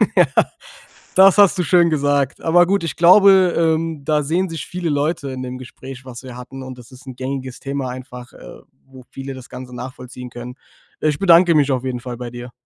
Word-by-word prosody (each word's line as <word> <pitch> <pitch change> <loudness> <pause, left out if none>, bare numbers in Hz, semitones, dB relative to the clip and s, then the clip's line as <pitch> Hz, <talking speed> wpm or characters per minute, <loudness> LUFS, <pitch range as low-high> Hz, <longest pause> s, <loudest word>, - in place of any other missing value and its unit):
Ja. - - +6 0.9
Das 190 +1 +6
hast 200 -1 +5
du 180 - +1
schön 170 +1 +4
gesagt. 145 -2 0
Aber 175 +2 +4
gut, 200 -2 +1
ich 165 - -4
glaube, 185 +1 +6
ähm, 160 -2 0
da 150 0 +1
sehen 175 +5 -1
sich 160 -4 -6
viele 180 -2 -4
Leute 145 -1 -1
in 130 - -6
dem 125 0 -6
Gespräch, 130 0 -11
was 125 0 -10
wir 125 -2 -9
hatten. 130 +2 -9
Und 130 -1 -9
das 125 +1 -15
ist 130 +1 -16
'n 130 - -8
gängiges 130 0 -5
Thema 140 -1 -4
einfach, 125 -1 -9
äh, - - -13 0.2
wo 130 -1 -15
viele 135 0 -7
das 130 -1 -11
Ganze 125 -1 -9
nachvollziehen 125 0 -9
können. 120 +1 -9 0.5
Ich 150 -2 +1
bedanke 175 -3 +5
mich 145 -2 +3
auf 130 -1 -1
jeden 125 -1 -3
Fall 120 -1 -7
bei 125 -1 -6
dir. 120 0 -9
135 Hz, 210 wpm, -19 LUFS, 125-165 Hz, 0.9 s, Ja